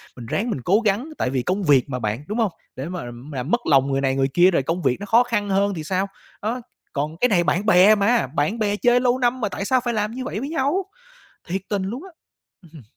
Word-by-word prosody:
mình 120 - -9
ráng 215 - -2
mình 135 - -3
cố 195 - +3
gắng 215 +9 +1
tại - - 0
vì 130 -1 -1
công 185 +9 -1
việc 140 -5 +3
mà 125 -1 -3
bạn, 110 +4 -3
đúng 215 - -3
hông? 220 -4 +2 0.2
Để 130 - -5
mà 180 -5 -5 0.3
làm 130 +5 -4
mất 240 - +2
lòng 140 -2 +3
người 135 0 0
này 135 -1 +1
người 135 0 +2
kia 180 +2 +5
rồi 165 - +1
công 165 +6 -2
việc 125 - +1
nó 205 - -6
khó 230 +4 +5
khăn 210 -4 -2
hơn 200 +1 +2
thì 160 -4 -5
sao, 190 +4 -1 0.3
đó, 235 +4 -2 0.3
còn 150 +3 -3
cái 250 - +3
này 175 -5 +3
bạn 170 +7 0
bè 200 +3 +6
mà, 210 - +2
bạn 150 - -1
bè 205 -1 +1
chơi 245 +3 +3
lâu 250 0 +2
năm 245 0 0
mà 210 - 0
tại 200 - -4
sao 255 +1 +2
phải 240 -1 -1
làm 210 0 -1
như 255 +2 -5
vậy 215 - -4
với 275 +4 -4
nhau? 320 +5 0 0.7
Thiệt 190 +3 -2
tình 200 -2 -1
luôn 230 - -4
á, 385 - -11 0.5
ừ 170 - -17
hừm. 155 -5 -12
200 Hz, 270 wpm, -22 LUFS, 150-235 Hz, 0.7 s, bè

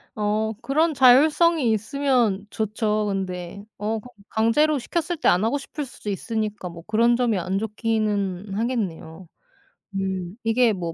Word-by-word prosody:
어, 215 0 0
그런 310 +4 +1
자율성이 285 +2 +5
있으면 220 -2 +1
좋죠. 215 0 -1
근데 190 -1 -4
어 215 +2 -2 0.3
강제로 290 +8 +2
시켰을 340 +6 -2
때 - - +1
안 180 +4 +4
하고 235 +6 +1
싶을 290 +1 -6
수도 225 -4 -8
있으니까 210 -1 -3
뭐 170 -1 -11
그런 230 +2 +3
점이 235 -4 +1
안 185 +2 -2
좋기는 210 -3 -1
하겠네요. 190 -7 -3 0.7
음 190 -1 -3
이게 225 +1 +3
뭐 170 -4 -4
220 Hz, 275 characters per minute, -23 LUFS, 195-250 Hz, 0.7 s, 자율성이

